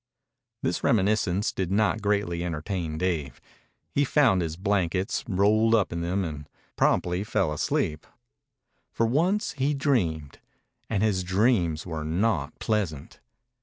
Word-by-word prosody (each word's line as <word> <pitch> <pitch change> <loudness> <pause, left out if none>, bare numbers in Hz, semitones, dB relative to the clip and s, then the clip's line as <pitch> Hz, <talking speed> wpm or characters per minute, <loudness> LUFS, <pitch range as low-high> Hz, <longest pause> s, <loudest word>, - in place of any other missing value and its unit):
This - - -1
reminiscence 105 -2 +2
did 95 -2 -3
not 110 +2 +2
greatly 100 -4 0
entertain 85 -1 -3
Dave. 80 -8 -2 0.5
He 145 - +2
found 130 -9 +3
his 80 -1 -3
blankets, 95 -1 0
rolled 110 +4 +3
up 105 -6 +1
in 85 - -3
them, 90 +3 -1
and 75 -3 -7 0.3
promptly 90 +2 +1
fell 95 -7 0
asleep. 75 0 -1 0.8
For 115 - +1
once 175 - +1
he 145 +1 0
dreamed, 85 - -1 0.5
and 105 -2 0
his 100 -4 +1
dreams 95 -4 +1
were 80 -3 -4
not 95 +9 -1
pleasant. 95 -10 -2
95 Hz, 130 wpm, -26 LUFS, 85-110 Hz, 0.8 s, found